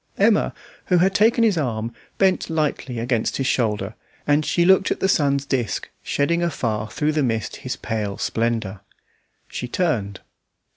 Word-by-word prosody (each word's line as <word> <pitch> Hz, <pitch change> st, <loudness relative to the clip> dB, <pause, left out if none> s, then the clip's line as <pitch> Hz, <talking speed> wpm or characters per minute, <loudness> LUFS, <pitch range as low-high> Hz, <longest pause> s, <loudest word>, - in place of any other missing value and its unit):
Emma, 210 Hz, +2 st, +3 dB, 0.3 s
who 180 Hz, -, +3 dB
had 190 Hz, +3 st, +3 dB
taken 230 Hz, +3 st, +4 dB
his 205 Hz, -7 st, +3 dB
arm, 115 Hz, -4 st, -2 dB, 0.2 s
bent 190 Hz, -2 st, +2 dB
lightly 150 Hz, -5 st, -1 dB
against 115 Hz, 0 st, 0 dB
his 135 Hz, -, -1 dB
shoulder, 110 Hz, -5 st, 0 dB, 0.3 s
and 145 Hz, +1 st, +3 dB
she 170 Hz, -, +2 dB
looked 190 Hz, +1 st, +5 dB
at -, -, -1 dB
the -, -, +2 dB
sun's 140 Hz, -5 st, +2 dB
disc 130 Hz, -6 st, -2 dB
shedding 170 Hz, +4 st, 0 dB
afar 115 Hz, -10 st, -1 dB
through 150 Hz, 0 st, 0 dB
the 155 Hz, 0 st, 0 dB
mist 115 Hz, -5 st, -1 dB
his -, -, -4 dB
pale 105 Hz, -3 st, -3 dB
splendour. 110 Hz, -4 st, -1 dB, 0.7 s
She 125 Hz, -, -5 dB
turned. 120 Hz, -, -1 dB
140 Hz, 155 wpm, -22 LUFS, 115-170 Hz, 0.7 s, looked